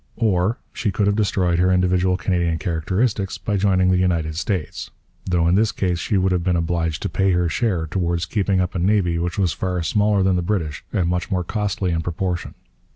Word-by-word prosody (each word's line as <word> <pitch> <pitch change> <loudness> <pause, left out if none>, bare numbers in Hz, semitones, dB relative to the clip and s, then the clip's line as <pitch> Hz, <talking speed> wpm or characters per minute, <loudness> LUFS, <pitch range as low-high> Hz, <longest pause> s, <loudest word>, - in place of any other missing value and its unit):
Or 100 0 +1 0.2
she 110 - -1
could 100 +1 0
have 100 0 +2
destroyed 95 -5 +1
her 90 +1 +3
individual 90 0 +2
Canadian 85 -3 0
characteristics 95 +5 -1
by 105 - -2
joining 95 -2 +2
the 90 - +3
United 85 -4 0
States; 85 +1 -3 0.4
though 85 -2 +2
in 85 - +3
this 105 +3 +3
case 90 -3 -1
she 100 - 0
would 95 0 +2
have 90 -2 0
been 90 0 +1
obliged 85 -2 -1
to - - 0
pay 95 +2 +1
her 90 0 +1
share 90 -3 0
towards 85 0 -1
keeping 100 -3 0
up 90 0 -1
a 90 - -2
navy 90 -2 +2
which 85 0 -2
was 95 -5 +1
far 90 -2 -2
smaller 105 +2 +2
than 95 -1 +2
the - - 0
British 85 -6 -2
and 90 -3 0
much 90 0 -1
more 90 -3 0
costly 100 -1 -2
in 80 -1 0
proportion. 90 +1 -3
90 Hz, 210 wpm, -21 LUFS, 85-100 Hz, 0.4 s, her